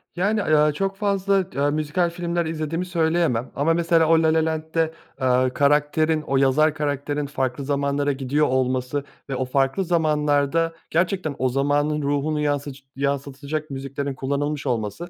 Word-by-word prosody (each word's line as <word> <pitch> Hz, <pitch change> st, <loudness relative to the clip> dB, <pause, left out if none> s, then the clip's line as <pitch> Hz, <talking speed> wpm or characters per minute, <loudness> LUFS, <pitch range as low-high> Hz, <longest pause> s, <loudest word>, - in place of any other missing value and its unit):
Yani, 205 Hz, +4 st, +1 dB
aaa, -, -, -3 dB
ya, 150 Hz, 0 st, +4 dB
çok 195 Hz, +5 st, -2 dB
fazla 195 Hz, -2 st, +1 dB
t 140 Hz, -, -4 dB
aaa, 145 Hz, +1 st, +2 dB
müzikal 155 Hz, +4 st, 0 dB
filmler 170 Hz, 0 st, -2 dB
izlediğimi 160 Hz, +2 st, -3 dB
söyleyemem 165 Hz, -8 st, 0 dB
ama, 150 Hz, +4 st, +2 dB
mesela, 165 Hz, -1 st, +3 dB
o 165 Hz, 0 st, +4 dB
La 160 Hz, 0 st, +3 dB
La 160 Hz, 0 st, +2 dB
Land'de, 160 Hz, 0 st, -1 dB, 0.3 s
aaa, 130 Hz, -1 st, +2 dB
karakterin 150 Hz, +2 st, +2 dB
o 135 Hz, -2 st, -1 dB
yazar 140 Hz, +3 st, +3 dB
karakterin 145 Hz, -1 st, -2 dB
farklı 135 Hz, -1 st, -3 dB
zamanlara 140 Hz, 0 st, 0 dB
gidiyor 140 Hz, +2 st, 0 dB
olması 130 Hz, +2 st, 0 dB, 0.3 s
ve 135 Hz, -, -2 dB
o 130 Hz, -, -1 dB
farklı 135 Hz, +7 st, +1 dB
zamanlarda 155 Hz, -1 st, +1 dB, 0.2 s
gerçekten 170 Hz, -2 st, 0 dB
o 130 Hz, -, +2 dB
zamanın 145 Hz, +3 st, +1 dB
ruhunu 145 Hz, +2 st, 0 dB
yansıc 145 Hz, -2 st, -2 dB
yansıtacak 140 Hz, +2 st, -3 dB
müziklerin 140 Hz, +1 st, -4 dB
kullanılmış 140 Hz, +3 st, -2 dB
olması 120 Hz, -, -2 dB
150 Hz, 155 wpm, -23 LUFS, 140-165 Hz, 0.3 s, ya